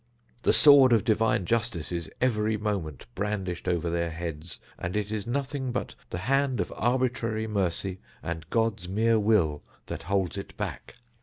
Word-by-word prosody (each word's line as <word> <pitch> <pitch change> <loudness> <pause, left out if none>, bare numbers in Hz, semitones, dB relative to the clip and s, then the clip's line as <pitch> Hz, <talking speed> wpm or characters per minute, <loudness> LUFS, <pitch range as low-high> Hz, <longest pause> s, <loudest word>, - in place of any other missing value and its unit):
The - - +4
sword 140 -4 +8
of 110 - +4
divine 110 -4 +2
justice 110 -7 -1
is 85 -2 -3
every 110 -3 +1
moment 100 -9 -3
brandished 95 -1 -3
over 85 -2 0
their 85 0 0
heads, 80 0 -5 0.2
and 90 +2 -3
it 105 0 -2
is 110 0 -3
nothing 135 +1 -2
but - - -3 0.2
the - - -4
hand 130 +5 +1
of - - -2
arbitrary 120 -3 0
mercy, 95 -2 -1 0.2
and 80 -1 -5
God's 110 -5 0
mere 110 +3 +3
will, 100 -9 +2 0.2
that - - -5
holds 95 +2 -1
it - - -10
back. - - -5
105 Hz, 160 wpm, -27 LUFS, 85-115 Hz, 0.2 s, sword